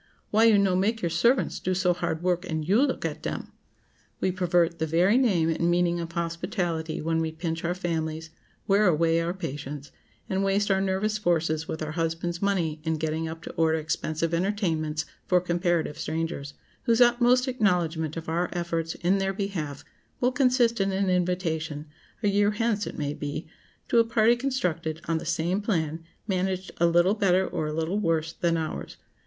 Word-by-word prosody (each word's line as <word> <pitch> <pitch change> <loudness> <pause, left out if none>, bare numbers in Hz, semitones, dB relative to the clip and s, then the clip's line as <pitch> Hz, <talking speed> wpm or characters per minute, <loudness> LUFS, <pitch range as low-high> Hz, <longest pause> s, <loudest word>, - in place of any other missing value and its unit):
"Why 220 +2 +5
you 220 -2 +6
no 195 -2 +3
make 215 +4 0
your 170 - 0
servants 235 +10 +2
do 185 0 -1
so 180 -1 +2
hard 170 -1 -3
work, 180 -1 +1
and 160 -1 -2
you 205 +7 +4
look 280 -2 0
at - - -3
dem?" - - -5 0.7
We 185 - +1
pervert 175 -2 +1
the 160 - 0
very 175 +7 +3
name 200 -11 +3
and 165 +1 +1
meaning 175 0 +2
of 170 0 -5
hospitality 170 -1 -2
when 165 0 +1
we 160 -1 -1
pinch 165 0 -4
our 175 +1 0
families, 160 -3 -3 0.3
wear 205 +1 +4
away 165 0 +3
our 170 +2 -2
patience, 145 -4 -6 0.4
and 190 +1 0
waste 200 +1 +1
our 190 0 +2
nervous 195 +3 0
forces 165 -4 0
with 160 -3 -4
our 155 - -4
husbands' 165 +1 -2
money 170 -6 0
in 160 0 0
getting 160 +1 -2
up 160 0 -7
to - - -6
order 160 -1 +2
expensive 155 +1 -2
entertainments 165 -5 0 0.2
for 180 - +4
comparative 175 -3 0
strangers, 155 -3 -3 0.3
whose 230 0 +3
utmost 245 +1 +4
acknowledgment 175 - 0
of 165 - -6
our 170 +2 0
efforts 165 -2 -2
in 185 +3 +1
their 195 0 0
behalf 175 -8 -4 0.3
will 250 +1 +2
consist 250 -4 +3
in 195 0 +1
an 190 0 +1
invitation, 165 -4 -1 0.4
a - - +3
year 205 +1 +3
hence 215 -1 0
it - - -7
may 145 -1 -2
be, 145 +2 -5 0.4
to 235 - +4
a - - +6
party 230 0 +3
constructed 180 - -2
on 165 -1 +1
the - - -8
same 170 +4 0
plan, 165 -6 -1 0.2
managed 190 -1 -1
a 170 - +4
little 175 +3 +4
better 190 -3 +2
or 155 - -2
a - - -3
little 165 +6 -1
worse 165 -4 0
than 170 -1 0
ours. 160 -1 -5
175 Hz, 185 wpm, -26 LUFS, 160-195 Hz, 0.7 s, you